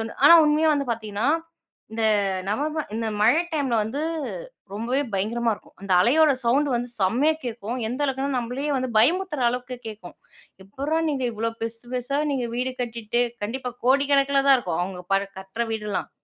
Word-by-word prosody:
தோணும். 225 Hz, +1 st, -6 dB
ஆனா 335 Hz, -, +10 dB
உண்மையா 305 Hz, +1 st, +3 dB
வந்து 280 Hz, -2 st, -2 dB
பாத்தீங்ன்னா, 215 Hz, +1 st, -3 dB, 0.6 s
இந்த 225 Hz, 0 st, -1 dB, 0.4 s
நவம்பர் 300 Hz, +7 st, -2 dB
இந்த 225 Hz, 0 st, -2 dB
மழை 240 Hz, +10 st, +5 dB
டைம்ல 275 Hz, -6 st, 0 dB
வந்து 220 Hz, +7 st, -3 dB, 0.7 s
ரொம்பவே 235 Hz, +6 st, -1 dB
பயங்கரமா 225 Hz, +4 st, 0 dB
இருக்கும். -, -, -20 dB
அந்த 195 Hz, -1 st, -2 dB
அலையோட 295 Hz, -, +5 dB
சவுண்டு 275 Hz, +5 st, +2 dB
வந்து 240 Hz, +1 st, -1 dB
செம்மையா 240 Hz, +11 st, +3 dB
கேக்கும். 235 Hz, 0 st, -4 dB
எந்த 250 Hz, +5 st, -4 dB
அளவுக்குன்னா, 270 Hz, 0 st, -1 dB
நம்பளயே 250 Hz, +5 st, -3 dB
வந்து 255 Hz, -1 st, -2 dB
பயமுறுத்ற 335 Hz, +5 st, +2 dB
அளவுக்கு 250 Hz, +1 st, -4 dB
கேக்கும். 210 Hz, -5 st, -10 dB, 0.5 s
எப்புர்றா 280 Hz, +11 st, -2 dB
நீங்க 265 Hz, -3 st, -2 dB
இவ்ளோ 225 Hz, +1 st, -2 dB
பெர்சு 230 Hz, +1 st, -5 dB
பெர்சா 255 Hz, +3 st, -1 dB
நீங்க 255 Hz, -3 st, -1 dB
வீடு 255 Hz, +1 st, -1 dB
கட்டிட்டு? 235 Hz, 0 st, -1 dB, 0.2 s
கண்டிப்பா 250 Hz, +3 st, -4 dB
கோடிக்கணக்குல 275 Hz, 0 st, +3 dB
தான் 270 Hz, -, +8 dB
இருக்கும். 175 Hz, -8 st, -2 dB
அவுங்க 180 Hz, 0 st, -5 dB
பல 195 Hz, -, +3 dB, 0.2 s
கட்ற 195 Hz, +5 st, -4 dB
வீடுல்லாம். 210 Hz, -2 st, -3 dB
245 Hz, 160 wpm, -24 LUFS, 220-275 Hz, 0.7 s, ஆனா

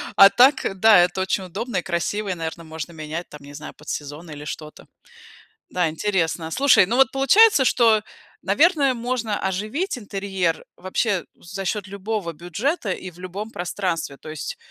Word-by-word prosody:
а 195 Hz, 0 st, +9 dB
так, 250 Hz, -7 st, +3 dB
да, 220 Hz, -3 st, +7 dB
это 180 Hz, +2 st, +2 dB
очень 190 Hz, +1 st, -1 dB
удобно 215 Hz, +5 st, -4 dB
и 180 Hz, -, +1 dB
красиво 190 Hz, +4 st, -2 dB
и, -, -, 0 dB
наверно, 165 Hz, 0 st, -5 dB
можно 160 Hz, +1 st, -7 dB
менять, 155 Hz, +2 st, -6 dB
там 150 Hz, -1 st, -12 dB
не 145 Hz, 0 st, -12 dB
знаю, 150 Hz, +1 st, -8 dB
под 150 Hz, -, -12 dB
сезон, 150 Hz, +3 st, -6 dB
или 150 Hz, 0 st, -8 dB
что-то. 150 Hz, 0 st, -8 dB, 0.8 s
Да, 180 Hz, -3 st, 0 dB
интересно. 165 Hz, -2 st, -1 dB
Слушай, 265 Hz, -, +5 dB
ну 230 Hz, -, -1 dB
вот 265 Hz, -1 st, +5 dB
получается, 275 Hz, -, +5 dB
что, 225 Hz, -4 st, +4 dB, 0.4 s
наверное, 295 Hz, -5 st, +3 dB
можно 235 Hz, -3 st, -2 dB
оживить 215 Hz, -, -2 dB
интерьер 195 Hz, -5 st, -2 dB
вообще 185 Hz, +1 st, -1 dB
за 195 Hz, +3 st, -8 dB
счет 200 Hz, +1 st, -2 dB
любого 200 Hz, -2 st, -4 dB
бюджета 195 Hz, -, -2 dB
и 185 Hz, -, -6 dB
в 175 Hz, -, -20 dB
любом 195 Hz, +4 st, -6 dB
пространстве. 175 Hz, -6 st, -3 dB
То -, -, -13 dB
есть, 155 Hz, -2 st, -5 dB
190 Hz, 165 wpm, -22 LUFS, 170-225 Hz, 0.8 s, а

